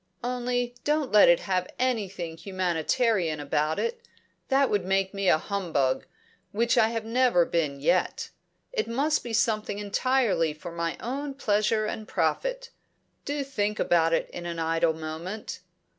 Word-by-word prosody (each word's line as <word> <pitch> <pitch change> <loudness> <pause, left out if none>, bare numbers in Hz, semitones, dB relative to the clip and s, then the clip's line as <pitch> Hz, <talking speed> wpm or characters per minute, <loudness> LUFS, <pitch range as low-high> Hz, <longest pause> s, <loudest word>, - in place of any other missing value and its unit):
Only 245 0 -1
don't 295 -2 0
let 210 -3 +7
it 170 - +5
have 185 -2 -1
anything 200 -10 -2
humanitarian 180 0 0
about 150 +2 0
it. 470 0 -2 0.5
That 270 0 +3
would 205 -3 +1
make 190 +1 0
me 195 -2 +1
a - - +5
humbug, 160 -8 -1 0.4
which 230 +3 +1
I 220 - +5
have 225 -1 -3
never 235 -6 +3
been 150 -5 -1
yet. 170 +5 0 0.4
It 445 - -1
must 280 +6 +1
be 240 - -6
something 215 -3 0
entirely 205 - +1
for 170 +3 -8
my 170 0 -3
own 275 +3 -4
pleasure 215 -3 +1
and 215 0 -5
profit. - - -1 0.5
Do 290 0 -2
think 210 -6 -2
about 165 -1 +3
it 165 - +1
in 175 0 -6
an 170 -1 -4
idle 165 0 +1
moment." 160 +6 -6
205 Hz, 150 wpm, -27 LUFS, 170-245 Hz, 0.5 s, let